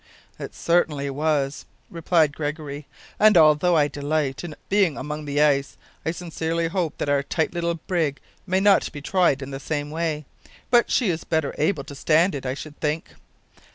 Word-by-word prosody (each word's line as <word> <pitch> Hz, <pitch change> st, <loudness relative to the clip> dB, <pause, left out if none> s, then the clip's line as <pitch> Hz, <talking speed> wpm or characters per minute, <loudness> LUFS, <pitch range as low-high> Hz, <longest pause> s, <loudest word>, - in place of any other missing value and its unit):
"It -, -, -7 dB
certainly 150 Hz, -5 st, +1 dB
was," 145 Hz, -1 st, -1 dB, 0.2 s
replied 165 Hz, -3 st, +2 dB
Gregory; 145 Hz, -1 st, -5 dB, 0.3 s
"and 215 Hz, -2 st, +6 dB
although 160 Hz, +2 st, +5 dB
I 145 Hz, -1 st, +4 dB
delight 145 Hz, -1 st, -2 dB
in 165 Hz, -4 st, -7 dB
being 195 Hz, -7 st, +2 dB
among 150 Hz, 0 st, -5 dB
the 145 Hz, 0 st, -1 dB
ice, 140 Hz, -2 st, +2 dB, 0.3 s
I -, -, -1 dB
sincerely 165 Hz, -1 st, -2 dB
hope 170 Hz, -3 st, -2 dB
that -, -, -3 dB
our 145 Hz, -1 st, +2 dB
tight 160 Hz, +3 st, -1 dB
little 170 Hz, -1 st, -1 dB
brig 160 Hz, -4 st, -2 dB, 0.3 s
may 185 Hz, +1 st, +2 dB
not 200 Hz, 0 st, +4 dB
be 150 Hz, -, -7 dB
tried 170 Hz, -6 st, +2 dB
in 135 Hz, -, -7 dB
the 135 Hz, -, -5 dB
same 145 Hz, +1 st, -3 dB
way. 155 Hz, -2 st, -2 dB, 0.5 s
But 240 Hz, -1 st, +4 dB
she 230 Hz, -8 st, +2 dB
is 165 Hz, -, -4 dB
better 160 Hz, -3 st, -1 dB
able 155 Hz, -1 st, +1 dB
to 140 Hz, -, -10 dB
stand 160 Hz, +6 st, +2 dB
it, 135 Hz, -2 st, -4 dB
I 130 Hz, -, -2 dB
should 150 Hz, +1 st, -10 dB
think." 155 Hz, +1 st, -2 dB
155 Hz, 180 wpm, -24 LUFS, 145-170 Hz, 0.5 s, and